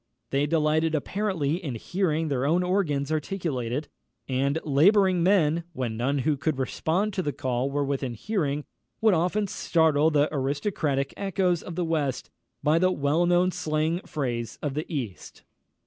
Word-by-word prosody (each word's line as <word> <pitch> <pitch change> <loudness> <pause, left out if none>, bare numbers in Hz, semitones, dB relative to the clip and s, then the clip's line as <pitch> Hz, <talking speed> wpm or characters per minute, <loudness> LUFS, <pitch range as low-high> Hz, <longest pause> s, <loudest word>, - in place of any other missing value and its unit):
They 140 +2 +1
delighted 155 0 +2
apparently 175 -1 -1
in 135 -7 -3
hearing 165 - -1
their 135 -2 0
own 165 +6 +2
organs 160 -7 0
articulate 155 -7 -2
it; 145 +4 -2 0.4
and 135 +3 0
labouring 185 +5 +4
men, 170 -3 +3
when 125 -6 -3
none 130 +5 0
who 150 -2 +2
could 155 0 -1
respond 170 +10 -1
to 190 - -1
the 150 - -1
call 130 -1 -1
were 145 +1 0
within 135 -3 -2
hearing, 150 - -2 0.3
would 220 -2 +4
often 180 +5 +1
startle 160 -5 +2
the 150 -1 +3
aristocratic 140 0 -1
echoes 185 -3 0
of 170 - -8
the 175 0 -1
West 150 -5 -1 0.3
by 155 +2 +4
the 185 +1 +3
well 150 +2 +1
known 175 +1 +3
slang 160 -1 -1
phrase 120 -5 -3
of 145 -3 -1
the 155 +4 -4
East. 120 - -6
155 Hz, 160 wpm, -26 LUFS, 140-175 Hz, 0.4 s, labouring